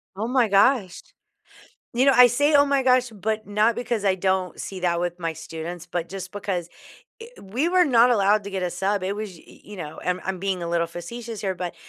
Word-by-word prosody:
Oh 215 +4 -3
my 250 -2 +2
gosh. 200 -1 +3 0.9
You 255 +3 +3
know, 275 - +6
I 250 - +9
say, 290 +6 +2
oh 285 0 +7
my 280 -1 +1
gosh, 255 -1 +3
but 215 +1 -3
not 210 +3 +2
because 235 -2 -3
I 195 -2 +3
don't 190 -1 -1
see 190 -1 -6
that 170 -1 0
with 175 0 -3
my 165 -2 -2
students, 160 +2 -7
but 170 -1 -3
just 190 -1 -7
because 190 -4 -3 0.5
eh, 455 - -8 0.2
we 240 - -1
were 360 0 +4
not 245 -4 +5
allowed 205 -2 +3
to 200 - -6
get 190 -1 -3
a 180 - -1
sub. 195 +3 -1
It 190 +2 -2
was 215 -1 -5
y 165 - -16 0.2
you 210 - -11
know 155 -4 -7
and 180 0 -2
I'm - - -13
I'm - - -11
being 190 -1 -2
a 170 - -3
little 170 0 0
facetious 220 +7 -7
here, 190 -2 -2
but 180 -1 -5
200 Hz, 230 wpm, -24 LUFS, 180-235 Hz, 0.9 s, I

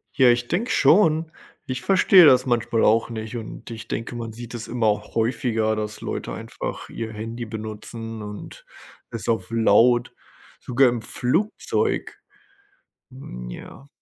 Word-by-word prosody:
Ja, 130 -3 +6
ich 120 0 0
denke 220 - -1
schon, 160 0 +4 0.3
ich 130 -2 -4
verstehe 190 -2 +6
das 130 -3 +6
manchmal 120 -2 +1
auch 115 +2 +3
nicht 110 0 -6
und 115 +1 -8
ich 115 -1 -8
denke, 115 +1 -4
man 115 -2 -5
sieht 120 +1 -9
es 115 -1 -6
immer 110 -4 +1
häufiger, 115 -1 0
dass 105 0 -5
Leute - - -4
einfach - - -6
ihr 115 -1 -5
Handy 115 +2 -5
benutzen 110 +1 -7
und 105 0 -9 0.5
es 115 -1 -6
auf 110 -6 0
laut 115 +2 +4 0.5
sogar 125 +1 +3
im 120 -2 -3
Flugzeug. 130 - -1 0.9
Mhm, 60 - -9
ja. 135 - -11
115 Hz, 140 wpm, -23 LUFS, 110-125 Hz, 0.9 s, Ja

